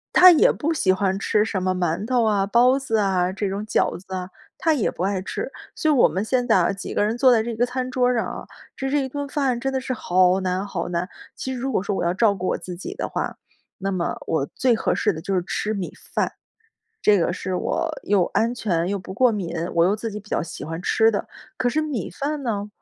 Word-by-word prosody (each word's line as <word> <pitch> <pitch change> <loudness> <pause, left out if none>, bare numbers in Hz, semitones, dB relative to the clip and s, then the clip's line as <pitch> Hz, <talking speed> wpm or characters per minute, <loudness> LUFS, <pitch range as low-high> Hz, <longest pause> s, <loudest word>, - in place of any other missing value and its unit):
他 365 0 +10
也 320 - +5
不 320 +3 0
喜 185 -11 +3
欢 190 0 0
吃 210 +1 +2
什 200 -4 -2
么 185 0 0
馒 180 +3 -1
头 250 -2 +2
啊、 205 -3 +2
包 250 +5 +4
子 225 -5 -1
啊、 190 -3 +1
这 200 -1 -2
种 200 +2 -3
饺 - - +1
子 190 0 -11
啊， 185 0 -4 0.3
他 325 -1 +2
也 260 - +1
不 180 - -4
爱 195 -1 0
吃。 425 - -4 0.2
所 310 - +1
以 - - +4
我 255 - +6
们 190 +3 -2
现 245 +1 0
在 225 - +4
啊， 175 +2 +3
几 195 - -6
个 - - +2
人 220 +3 0
坐 255 -1 +6
在 220 -1 +3
这 235 0 -3
个 240 +2 +2
餐 255 0 -3
桌 250 0 +2
上 230 - 0
啊， - - -7 0.3
吃 270 0 -2
这 285 -1 +1
一 265 - -4
顿 285 +1 -4
饭 270 -4 0
真 270 +1 -2
的 260 - 0
是 255 - -3
好 185 -3 +3
难 185 +1 -1
好 180 -4 -3
难。 175 +1 -2 0.3
其 260 - -4
实 250 - -5
如 265 - -2
果 195 - 0
说 200 - -2
我 - - -1
要 175 - +1
照 205 +1 +3
顾 185 -1 -4
我 - - 0
自 180 -1 -8
己 - - -6
的 - - -3
话， - - -3 0.4
那 195 0 -2
么 180 -3 -1
我 145 -4 0
最 255 -2 +3
合 220 - 0
适 210 - +2
的 160 - -6
就 190 +4 -2
是 180 - +1
吃 215 +2 -2
米 190 -4 -4 0.2
饭， - - +1 0.7
这 205 -2 +5
个 175 - +1
是 185 0 -4
我 - - -1
又 195 -3 +3
安 230 +2 0
全、 175 -8 0
又 200 0 -1
不 190 +1 -9
过 250 0 +4
敏， 175 -5 -3 0.2
我 170 +1 +4
又 205 +3 +2
自 225 +1 -4
己 210 +1 -6
比 210 - -18
较 - - 0
喜 165 - -8
欢 165 +3 -5
吃 225 +3 +4
的。 205 - -2 0.3
可 245 - +1
是 310 - +1
米 285 - -3
饭 285 - -3
呢， 210 -4 -2
210 Hz, 280 characters per minute, -23 LUFS, 185-250 Hz, 0.7 s, 他